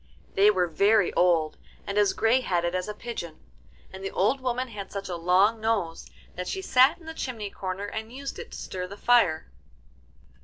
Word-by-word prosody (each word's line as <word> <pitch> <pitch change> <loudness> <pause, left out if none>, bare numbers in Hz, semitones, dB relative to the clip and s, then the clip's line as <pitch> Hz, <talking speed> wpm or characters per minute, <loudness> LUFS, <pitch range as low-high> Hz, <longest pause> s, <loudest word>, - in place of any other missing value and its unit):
They 200 +2 +5
were 185 -4 +2
very 200 +5 +3
old, 165 -3 +2 0.3
and 200 - -4
as 205 -2 +3
grey 230 +4 +3
headed 175 -6 0
as 185 +1 -2
a 210 - -4
pigeon, 210 -9 -7 0.5
and 190 0 -8
the 195 - -2
old 215 +10 +1
woman 255 0 -2
had 200 -4 -8
such 200 -1 -5
a 180 - -3
long 185 +6 +3
nose 210 -7 -1 0.3
that 180 0 -5
she 385 - -3
sat 260 -4 +5
in 340 - -17
the 320 - -6
chimney 225 -9 -5
corner 190 +1 -4
and 220 +2 -6
used 275 +2 -6
it 470 - -9
to - - -7
stir 180 -1 -5
the 200 +2 -10
fire. 200 - +3
200 Hz, 195 wpm, -27 LUFS, 180-235 Hz, 0.5 s, They